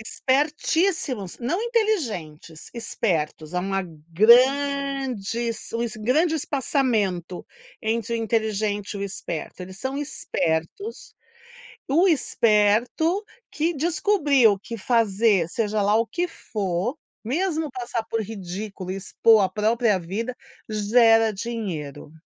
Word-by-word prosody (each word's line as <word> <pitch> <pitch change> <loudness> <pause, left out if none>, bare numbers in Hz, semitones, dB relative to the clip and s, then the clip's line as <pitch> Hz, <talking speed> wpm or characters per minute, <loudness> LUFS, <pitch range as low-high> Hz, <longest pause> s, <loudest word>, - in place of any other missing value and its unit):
Espertíssimos. 285 - 0
Não 290 - -1
inteligentes, 230 - -2
espertos. 170 -9 -2
Há 180 - +1
uma 195 +1 -1 0.3
grande 265 +1 +3
es 230 0 -4
grande 305 +10 +2
espaçamento 225 - -1 0.4
entre 230 +1 -1
o - - +1
inteligente 215 -2 -1
e - - -4
o - - -4
esperto. 185 -3 -6
Eles 185 +1 -10
são 265 +3 -3
espertos. 280 - -3 0.7
O 325 +8 +4
esperto 240 - +2 0.3
que 325 +3 -1
descobriu 290 - +3
que 230 +3 -7
fazer 215 -5 +2
seja 215 +2 -1
lá 205 +1 +3
o 230 +1 +2
que 350 +6 -2
for, 205 - -3 0.3
mesmo 315 - -1
passar 240 -2 -3
por 225 0 -2
ridículo 195 -2 -6
e 190 - -3
expor 215 +2 +4
a 190 - +2
própria 220 0 +1
vida, 215 +8 -4 0.3
gera 225 +1 +4
dinheiro. 180 - -5
225 Hz, 110 wpm, -24 LUFS, 200-275 Hz, 0.7 s, O